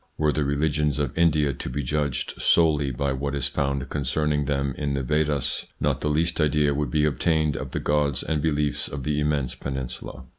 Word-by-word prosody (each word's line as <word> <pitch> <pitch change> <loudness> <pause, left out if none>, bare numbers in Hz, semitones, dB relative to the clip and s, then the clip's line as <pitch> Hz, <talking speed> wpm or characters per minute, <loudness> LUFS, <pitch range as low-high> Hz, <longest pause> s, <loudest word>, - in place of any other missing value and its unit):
Were 75 -1 +2
the 75 - 0
religions 75 +1 +1
of 70 -4 -2
India 75 -4 +3
to - - -5
be 70 +3 -3
judged 70 -1 -2
solely 75 -4 +4
by 65 +2 -1
what 70 +2 -2
is 70 -3 0
found 70 -1 -1
concern 75 +2 0
ing 75 -1 0
them 70 -1 0
in 70 -2 -2
the 70 - -1
Vedas, 75 0 0
not - - 0
the 75 - 0
least 80 +2 +1
idea 75 -1 +2
would 75 +1 -1
be 75 -1 +2
obtained 75 0 +1
of - - -4
the - - -3
gods 75 -2 +1
and 75 -2 -1
beliefs 75 -2 0
of 70 -1 -6
the 75 +1 0
immense 75 -4 0
peninsula. 65 -2 -6
75 Hz, 200 wpm, -25 LUFS, 70-75 Hz, -, solely